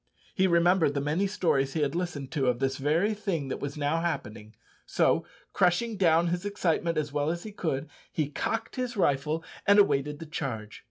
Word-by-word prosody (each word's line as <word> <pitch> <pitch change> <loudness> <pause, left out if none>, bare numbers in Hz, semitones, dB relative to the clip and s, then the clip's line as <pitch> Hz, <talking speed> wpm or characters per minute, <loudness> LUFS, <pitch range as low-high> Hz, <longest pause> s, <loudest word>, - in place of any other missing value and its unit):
He 190 0 +3
remembered 170 -3 +3
the - - +1
many 155 +8 0
stories 165 -9 +1
he 160 - -1
had 145 - 0
listened 165 -6 -3
to 140 -4 0
of 125 -1 +2
this 135 +1 -1
very 160 +10 +1
thing 185 -10 -3
that - - -3
was 140 +1 -5
now 150 +3 0
happening; 110 -10 -4 0.3
so, - - +2 0.3
crushing 195 +6 +2
down 170 -3 +3
his 175 +1 -2
excitement 175 -4 0
as 145 -2 -2
well 145 +1 0
as 170 +1 -3
he 215 - -7
could, 155 -7 -2 0.2
he 155 -3 -1
cocked 225 - -3
his 250 -3 -3
rifle 150 -1 +1 0.2
and 200 +1 +6
awaited 150 -7 +3
the 165 - -8
charge. 120 -9 -5
160 Hz, 195 wpm, -28 LUFS, 140-180 Hz, 0.3 s, and